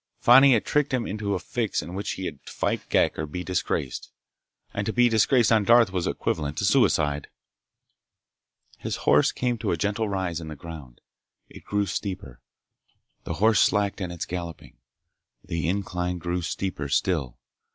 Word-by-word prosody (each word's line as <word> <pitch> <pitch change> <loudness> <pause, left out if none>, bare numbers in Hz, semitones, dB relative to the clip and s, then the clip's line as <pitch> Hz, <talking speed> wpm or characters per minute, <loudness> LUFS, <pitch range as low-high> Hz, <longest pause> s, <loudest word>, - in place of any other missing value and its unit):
Fani 135 +3 +7
had 115 - +1
tricked 150 -3 +1
him 120 - -2
into 100 -1 -2
a - - -2
fix 110 +4 -2
in 85 - -8
which 100 +2 -3
he 95 - -6
had 75 -5 -6
to - - -8
fight - - -2
Ghek - - +2
or 75 - -2
be 90 +4 -5
disgraced—and 90 - -5
to - - +1
be 120 +1 +4
disgraced 115 +2 +3
on 110 -2 +4
Darth 115 -1 +5
was 90 -2 -1
equivalent 75 -1 -2
to 100 - 0
suicide. 75 - +2 1.5
His - - -3
horse - - +5
came 120 -2 -2
to - - -2
a 85 - 0
gentle 105 +4 -1
rise 95 -4 -2
in 80 - -8
the 80 - -7
ground. 75 -5 -10 0.5
It - - -13
grew 105 0 0
steeper. 90 - -5 0.8
The - - -3
horse 110 +2 +3
slacked 100 0 +2
in 90 - -3
its 85 -1 -5
galloping. 85 -2 -7 0.7
The 85 0 -2
incline 90 -2 -2
grew 90 +1 -2
steeper 80 -4 -3
still. 70 -5 0
95 Hz, 170 wpm, -25 LUFS, 85-110 Hz, 1.5 s, Fani